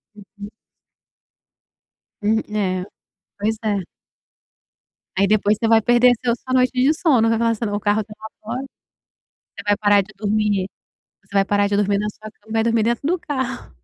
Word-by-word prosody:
Uhum. 205 0 -11 1.7
Hum, 220 +2 +2
é, 185 -3 -1 0.6
pois 220 +2 0
é. 200 -4 -1 1.3
Aí 200 +1 +3
depois 210 0 +2
você 225 - +1
vai 225 0 +5
perder 240 +2 +5
seu 235 -1 +2
sua 255 +1 -6
noite 255 -1 +3
de 260 +4 +3
sono 265 -9 +3
vai 225 - +2
falar 230 0 +2
assim: 230 +1 -3
"o - - -2
meu 205 - -1
carro 210 +1 +1
tá 210 - -12
lá 220 - -10 0.2
fora". 245 +4 -4 0.8
Você - - -13
vai 205 0 +3
parar 205 -1 +4
de 215 +3 -15
dormir 205 -2 0 0.6
você 200 - -18
vai 195 0 +4
parar 205 0 +1
de 200 - 0
dormir 200 -1 +1
na 210 +1 -2
sua 215 +1 -12
cama 220 - -23
e - - -5
vai 225 0 +2
dormir 230 -1 +2
dentro 235 +5 0
do 355 +2 +1
carro. 260 - -4
215 Hz, 185 wpm, -21 LUFS, 205-235 Hz, 1.7 s, vai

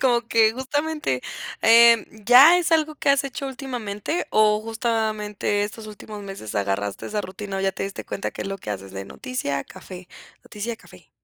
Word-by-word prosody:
como 240 -3 +3
que 220 -1 +4
justamente, 280 - -2 0.4
em, 230 0 +7 0.2
¿ya 270 +8 +8
es 345 -1 0
algo 310 -1 +2
que 295 - -3
has 280 0 +3
hecho 275 +1 -5
últimamente 250 - -4
o 215 0 +4
justamente 220 -3 -1
estos 215 +1 -8
últimos 210 0 -9
meses 195 - -8
agarraste 100 0 -2
esa 210 0 -2
rutina 195 0 -6
o - - -1
ya 195 0 +1
te 190 - -5
diste 195 0 -5
cuenta 195 - -4
qué - - -6
es - - -5
lo 195 0 -5
que 105 - -7
haces 95 -1 -6
de 95 0 -6
noticia-café, 185 - -6 0.3
noticia-café? 225 +2 -8
215 Hz, 170 wpm, -23 LUFS, 195-255 Hz, 0.4 s, ya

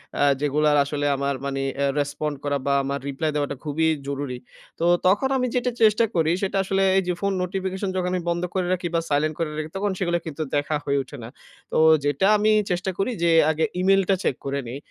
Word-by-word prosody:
অ্যা 145 - +2 0.2
যেগুলার 150 +1 +2
আসলে 145 +1 -3
আমার 140 0 -1
মানে 135 0 -2 0.2
অ্যা 140 0 +1
রেসপন্ড 145 +1 -2
করা 145 -1 0
বা 140 - +2
আমার 140 +1 -2
রিপ্লাই 155 +3 -2
দেওয়াটা 145 -1 -1
খুবই 160 +2 +1 0.2
জরুরি। 140 -2 -3 0.4
তো 170 - 0 0.2
তখন 205 +8 +3
আমি 250 -1 0
যেটা 250 0 +1
চেষ্টা 220 +1 +5
করি, 160 -1 +2
সেটা 195 0 -1
আসলে 195 0 0
এই - - +4
যে, 180 - +1
ফোন 200 0 +1
নোটিফিকেশন 190 +1 -3
যখন 180 -1 0
আমি 180 - -1
বন্ধ 170 +1 -1
করে 185 -1 0
রাখি 180 -1 -2
বা - - +3
সাইলেন্ট 150 +2 +1
করে 165 - -1
রাখি, 155 0 -4
তখন 200 0 0
সেগুলা 175 -2 0
কিন্তু 155 0 -6
দেখা 145 +1 0
হয়ে 140 0 +1
উঠে 145 +2 -11
না। 115 - -7 0.4
তো - - 0 0.3
যেটা 145 +7 +2
আমি 215 +1 +3 0.2
চেষ্টা 180 +2 -1
করি 195 +6 0
যে, 170 - +4 0.2
আগে 160 +1 0
ই-মেইলটা 195 +1 +3
চেক - - +1
করে 140 0 -1
নিই। 125 +4 -5
160 Hz, 215 wpm, -24 LUFS, 145-190 Hz, 0.4 s, চেষ্টা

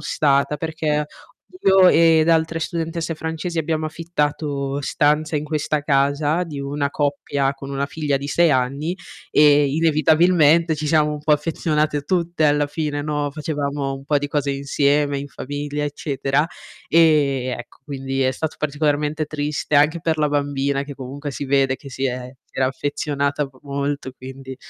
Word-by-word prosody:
stata, 140 0 +1
perché 150 -1 -1 0.6
io 190 -1 +6
ed 165 -1 +5
altre 165 0 +2
studentesse 165 -1 -3
francesi 160 +2 -4
abbiamo 160 0 -1
affittato 150 -3 -2
stanze 150 +3 +1
in 150 - -1
questa 150 -1 -1
casa, 145 +4 +1
di 145 -4 -6
una 140 0 -2
coppia 140 -1 -1
con 135 0 -9
una 140 0 -1
figlia 145 -1 -1
di 140 +1 -5
6 165 +1 +3
anni, 140 +7 -1 0.4
e 145 -1 +6
inevitabilmente 160 +1 +3
ci 150 - -3
siamo 150 0 +3
un 150 - -4
po' 150 +1 +1
affezionate 150 -1 0
tutte 170 0 0
alla 145 0 +3
fine, 145 -2 -3
no, 145 -1 -2
facevamo 145 -2 -3
un 135 0 -10
po' 145 0 +2
di 145 - -4
cose 145 -1 0
insieme 140 +1 +1
in 140 - -5
famiglia, 145 +1 -5
eccetera. 145 0 -1 0.4
E 150 -6 +3
ecco 120 - -11
quindi 135 -1 -3
è 130 - +2
stato 155 +4 -4
particolarmente 150 +1 0
triste, 150 0 -3
anche 150 +4 +4
per 160 -1 0
la 150 - +2
bambina 140 -1 -1
che 140 -1 -8
comunque 140 +2 -6
si 140 - -5
vede 135 -1 +2
che 135 0 -11
si 135 +1 -4
è 125 0 -4
si - - -22
era 130 - +3
affezionata 140 +1 -2
m - - -8
molto, 140 -1 -3
quindi 130 0 -9
145 Hz, 160 wpm, -21 LUFS, 140-155 Hz, 0.6 s, io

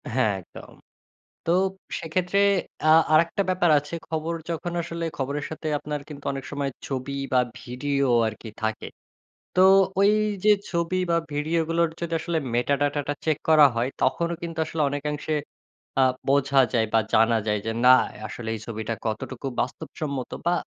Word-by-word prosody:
হ্যাঁ, 110 -6 +3
একদম। 85 - -13 0.7
তো 165 - +3 0.5
সেক্ষেত্রে 180 +4 -1 0.5
আ - - +4 0.2
আরেকটা 165 +5 +3
ব্যাপার 180 -2 +2
আছে। 145 +3 -7
খবর 160 +1 -2 0.2
যখন 170 +1 -3
আসলে 170 0 -5
খবরের 140 +2 -2
সাথে 160 0 -6
আপনার 150 0 -4
কিন্তু 145 -2 -10
অনেক 135 -1 -5
সময় 140 -1 -2 0.2
ছবি 135 0 -4 0.2
বা 130 - +5 0.2
ভিডিও 140 +2 -1 0.2
আরকি 110 +1 -8
থাকে। 110 0 -2 0.7
তো 185 - +3 0.4
ওই 200 +1 +6 0.3
যে 215 - +6 0.2
ছবি 170 +1 -1
বা 170 - +3 0.2
ভিডিওগুলোর 165 +3 +1
যদি 170 -1 -4
আসলে 165 0 -1 0.2
মেটা 125 +4 +2
ডাটাটা 145 0 0
চেক 155 -2 +1
করা 155 -2 +8
হয় 120 +2 +1
তখনও 170 +6 +1
কিন্তু 165 -1 -5
আসলে 160 - -4
অনেকাংশে 150 +2 -3 0.7
আ - - +6 0.3
বোঝা 140 0 +3
যায় 115 -2 +3
বা 115 - +5
জানা 115 +1 +4
যায় 105 0 +1
যে 115 - -1
না - - +8 0.4
আসলে 110 +1 -6
এই - - -7
ছবিটা 110 0 -3
কতটুকু 115 +4 -4
বাস্তবসম্মত 140 +1 -4
বা 175 - +3
145 Hz, 155 wpm, -25 LUFS, 130-165 Hz, 0.7 s, করা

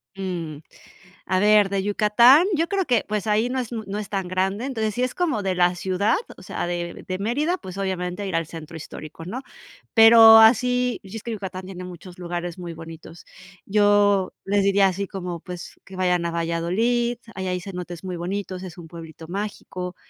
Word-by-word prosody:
Mm. 175 -6 -4 0.7
A 185 0 +1
ver, 210 0 +5
de 195 -1 -1
Yucatán, 235 - +5
yo 330 +2 +1
creo 390 -2 0
que, 245 -6 +2
pues, 210 0 -2
ahí 215 +3 +2
no 260 - -1
es 245 -2 -4
muy 220 -2 -5
no 205 +2 -3
es 210 - -6
tan 195 -3 -2
grande. 190 +5 -1
Entonces, 220 -6 -2
si 250 - 0
es 255 - -1
como 310 - 0
de 190 -1 0
la 175 0 +3
ciudad, 190 +4 +1 0.2
o - - -13
sea, - - -4
de 175 0 -4
de 185 0 -3
Mérida, 290 - 0
pues, 185 - -9
obviamente, 185 0 -3
ir 185 - -3
al 165 -1 0
centro 160 0 -9
histórico, 155 +1 -9
¿no?, 230 +9 -5 0.5
pero 225 0 +9
así 250 +2 +4
y 195 +2 -10
es 225 - -7
que 235 - -5
Yucatán 190 -3 -6
tiene 185 -1 -8
muchos 180 0 -11
lugares 175 0 -4
muy 175 -2 -6
bonitos. 165 +1 -11 0.4
Yo 205 -1 +3
les 200 0 +2
diría 195 0 +4
así 195 +2 -2
como, 180 -3 -5
pues, 180 -1 -9
que 190 - -12
vayan 180 -2 +1
a 170 - -1
Valladolid, 185 +9 0 0.2
ahí 190 -1 -4
hay 180 -1 -2
cenotes 180 -3 -7
muy 185 -1 -4
bonitos, 185 +1 -4
es 185 -1 -9
un 170 -2 -10
pueblito 165 -1 -11
mágico, 185 -1 -5
195 Hz, 195 wpm, -23 LUFS, 175-215 Hz, 0.7 s, pero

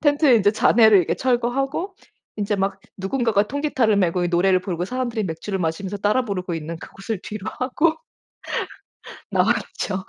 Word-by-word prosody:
텐트의 290 -4 +5
인제 205 0 +3
잔해를 220 -2 +5
이렇게 175 - +1
철거하고 270 +9 -1 0.4
인제 205 0 -1
막 195 +1 -1 0.2
누군가가 210 +1 +1
통기타를 265 -7 +1
메고 180 -2 +1
이 - - 0
노래를 185 +1 +3
부르고 180 -2 -3
사람들이 240 -3 -2
맥주를 190 +4 -4
마시면서 185 +4 -3
따라 215 +6 +1
부르고 185 -4 -3
있는 165 +1 -5
그곳을 195 +3 -6
뒤로하고 255 - -1 1.3
나왔죠. 190 -1 0
205 Hz, 375 characters per minute, -22 LUFS, 185-250 Hz, 1.3 s, 텐트의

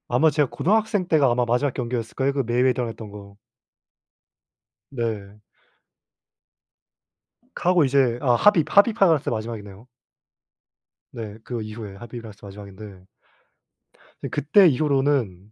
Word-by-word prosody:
아마 150 +6 +3
제가 145 -2 0
고등학생 210 -1 0
때가 150 -6 +3
아마 120 0 +1
마지막 125 +3 0
경기였을 120 -3 -4
거예요 135 +1 0
그 135 -1 -1
메이웨더랑 125 0 +1
했던 110 -1 -9
거. 100 -1 -12 1.5
네. 105 -5 -5 2.1
카고 180 -2 +2
이제 130 -3 +2
아 125 -4 +3
하빕 195 - +4
하빕 205 +2 +4
할 170 -7 +4
때가 - - -4
마지막이네요. 110 -1 -7 1.3
네. 110 -2 -7
그거 120 -2 -5
이후에 110 -2 -8
하빕이랑 120 +1 -9
했었던 100 -1 -12
게 100 - -14
마지막인데 95 -2 -13 1.2
그때 180 +7 +4
이후로는 135 - 0
120 Hz, 290 characters per minute, -23 LUFS, 110-145 Hz, 2.1 s, 하빕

